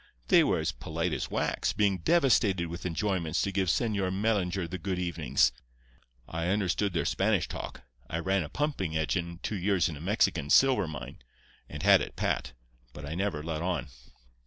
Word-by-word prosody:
They - - +7
were - - +2
as - - -1
polite 80 +6 -3
as - - -3
wax, - - -1
being 100 -3 +1
devastated 100 - +3
with 85 +2 -5
enjoyments 85 -1 -1
to 100 - -1
give 95 -1 0
Señor 100 0 +1
Mellinger 95 -3 0
the 95 +2 -6
good 95 +2 -2
evenings. 85 -3 +1 0.8
I 80 +1 -3
understood 100 0 0
their 85 - 0
Spanish 100 -3 +1
talk—I 60 +3 -8
ran 95 +3 +1
a 75 - -5
pumping 100 - -1
engine 85 +3 -2
two 105 - -2
years 95 -2 +2
in 80 - -6
a - - -10
Mexican 85 -5 +1
silver 130 - +5
mine, 70 -6 -7 0.5
and 75 +2 -7
had 100 -1 +6
it - - -5
pat—but - - -5
I 70 - -5
never 90 -4 -2
let 80 -1 -3
on. 90 -3 -2
90 Hz, 170 wpm, -29 LUFS, 80-100 Hz, 0.8 s, They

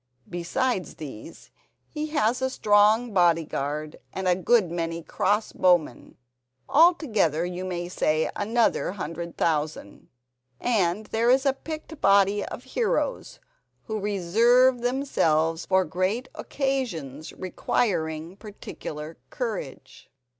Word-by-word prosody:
Besides 185 +4 -2
these, 150 0 -10 0.4
he 305 0 -4
has 250 -5 0
a 260 - +1
strong 215 0 +3
bodyguard 155 -4 0
and 190 -1 -3
a 180 - +5
good 190 0 +2
many 165 -1 -3
cross 210 +6 0
bowmen. 175 -8 +1 0.5
Altogether 260 - +3
you 180 +1 -5
may 175 -2 -4
say 155 -3 0
another 225 -3 +1
hundred 170 -2 -6
thousand, 150 -9 -2 0.5
and 210 -3 0
there 230 +3 0
is 265 +2 +4
a 275 - +3
picked 310 +2 -8
body 200 +1 +4
of - - -7
heroes - - -2 0.4
who 220 -2 -4
reserve 230 +6 +3
themselves 165 - +1
for 190 -1 +3
great 185 +10 -1
occasions 195 - -3
requiring 170 -3 -2
particular 160 -7 -8
courage." 220 - -6
190 Hz, 110 wpm, -25 LUFS, 165-240 Hz, 0.5 s, a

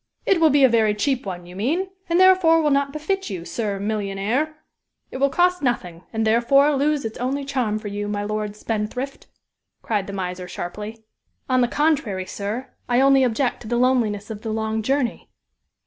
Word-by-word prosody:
"It 375 -4 +3
will 320 - +6
be 285 -1 +4
a - - +9
very 220 -3 +2
cheap 255 +1 -1
one, 175 -2 -5
you 180 +1 -12
mean, 315 - -1 0.2
and, 340 +1 +3
therefore, 370 -3 +6
will 300 -2 +2
not 280 0 +2
befit 345 +5 -2
you, 180 -4 -5
Sir 210 -2 -3
Millionaire! 210 +8 -1 0.6
It - - -5
will 275 +1 +3
cost 360 +3 +2
nothing, 180 - -2
and, 220 -1 -1
therefore, 275 +6 +4
lose 285 -1 +1
its 220 - -5
only 270 +3 -2
charm 250 -6 -1
for 215 - -7
you, 205 0 -4
my 205 0 -2
Lord 210 0 -3
Spendthrift," 225 +5 -4 0.6
cried 205 -3 -1
the 200 - -6
miser, 180 -1 -4
sharply. 210 +6 -7 0.4
"On 255 -1 +3
the 245 - +3
contrary, 240 -11 0
sir, 215 +8 -5 0.2
I 245 0 +3
only 270 0 +5
object 245 +1 0
to 220 - -9
the 240 +1 0
loneliness 230 -5 +1
of 210 -1 -7
the 225 - -5
long 220 0 -1
journey." 260 +1 -1
235 Hz, 190 wpm, -22 LUFS, 210-280 Hz, 0.6 s, a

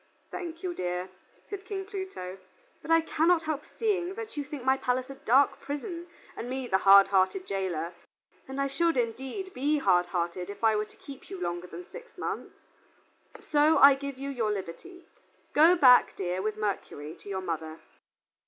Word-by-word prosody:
"Thank 340 -1 -6
you, 360 -1 -2
dear," 180 - -3 0.4
said 405 -2 -6
King 390 -1 -5
Pluto, 375 - -6 0.4
"but - - -11
I 330 0 +5
cannot 325 +1 +2
help 310 -2 -2
seeing 390 -5 -2
that 450 0 -7
you 290 - -2
think 285 -2 -7
my 265 0 +4
palace 255 0 -1
a - - -6
dark 270 +1 +3
prison 335 +5 -5 0.3
and 240 - -6
me 260 0 -3
the 190 -5 +1
hard 195 0 +7
hearted 195 - +2
jailor, 180 -4 -3 0.5
and 265 +1 -6
I 275 - +2
should, 330 +3 +1
indeed, 265 - -3
be 290 +4 +1
hard 180 -10 +3
hearted 175 +1 -3
if 200 - -9
I 220 -1 +5
were 210 0 0
to - - -22
keep 275 -2 -12
you 190 - -7
longer 175 0 -3
than 360 - -9
six 485 0 -12
months. - - -5 0.9
So 300 +2 +3
I 280 0 +9
give 275 0 -6
you 275 +1 -4
your 235 -5 -1
liberty. 210 - -6 0.5
Go 325 +4 +7
back, 255 -7 +6
dear, 180 0 -2
with 215 +1 -2
Mercury, 185 -7 -4
to - - -12
your 190 -1 -3
mother." 160 -3 -4
265 Hz, 180 wpm, -28 LUFS, -, 0.9 s, I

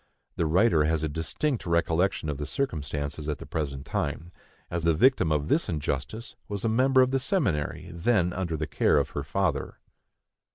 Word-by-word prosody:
The 85 - 0
writer 85 -2 +4
has 80 0 0
a - - +1
distinct 85 - -2
recollection 85 +1 +1
of 75 -2 -3
the 75 - -3
circumstances 75 - -3
at 75 - -1
the - - -9
present 70 -3 -4
time, 70 +4 -3 0.4
as 85 -1 -2
the 85 -1 +3
victim 130 - +4
of 75 -1 +1
this 155 - +1
injustice 75 - -3
was 100 +1 -4
a - - +2
member 130 +3 +4
of 130 - 0
the 135 - +2
seminary 130 - -1
then 90 0 +1
under 90 -3 -2
the 75 - -2
care - - +2
of - - 0
her - - -3
father. - - -1
85 Hz, 180 wpm, -27 LUFS, 75-110 Hz, 0.4 s, writer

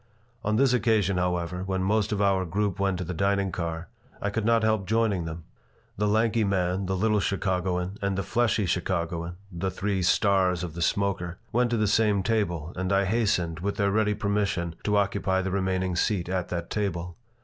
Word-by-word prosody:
On 110 -1 +1
this 130 +2 +4
occasion, 110 -6 +2
however, 90 0 -1
when 95 0 -1
most 105 +2 +1
of 105 -1 +1
our 95 -1 +2
group 100 +2 -1
went 95 -2 +1
to 90 - -3
the 90 +1 -4
dining 100 +1 +1
car 85 0 -4 0.3
I 100 - -2
could 110 0 -2
not 115 0 +3
help 110 -3 +1
joining 110 -6 +1
them. 80 0 -6 0.5
The 105 +1 0
lanky 110 +2 +2
man, 95 -1 0
the 95 - 0
little 105 +2 +2
Chicagoan, 95 -1 -1
and 100 -1 -1
the 100 - -1
fleshy 115 +1 +1
Chicagoan 85 -1 -2 0.2
the 85 +2 -2
three 95 +1 -1
"stars" 95 -1 +2
of 85 -3 -5
the 85 - -6
smoker 90 -1 0
went 120 +1 +2
to 120 - 0
the 110 - +2
same 105 -1 +2
table, 90 -7 -1
and 95 +1 -2
I 100 0 +3
hastened, 95 -6 0
with 100 +3 -2
their 100 -1 +1
ready 105 0 +2
permission, 100 -5 -1
to 105 -1 +2
occupy 100 -2 +1
the 95 - -2
remaining 95 -1 0
seat 90 -1 0
at 90 -2 -1
that 85 -1 -4
table. 90 -4 -2
95 Hz, 195 wpm, -27 LUFS, 90-105 Hz, 0.5 s, this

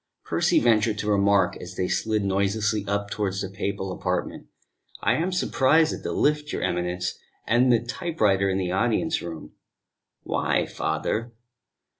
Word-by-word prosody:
Percy - - +2
ventured 110 -2 +2
to 105 - -3
make - - -1
a - - +4
remark 100 -2 +3
as - - -9
they 90 - -1
slid 110 0 0
noiselessly 100 +2 0
up 100 0 -2
towards 100 -2 -2
the 95 - -4
papal 95 0 -3
apartment. 90 0 -3 0.5
"I 110 - +3
am 165 +7 0
surprised 160 -3 +3
at - - -6
the - - -3
lift, 150 0 +1
your - - -3
Eminence, 90 0 -2 0.3
and 125 +2 +4
the 120 0 +2
typewriter 110 - +1
in 95 - 0
the 90 -2 -1
audience 120 - +1
room." 85 -2 -8 0.7
"Why, - - 0
father?" 115 +2 -2
105 Hz, 160 wpm, -25 LUFS, 95-120 Hz, 0.7 s, a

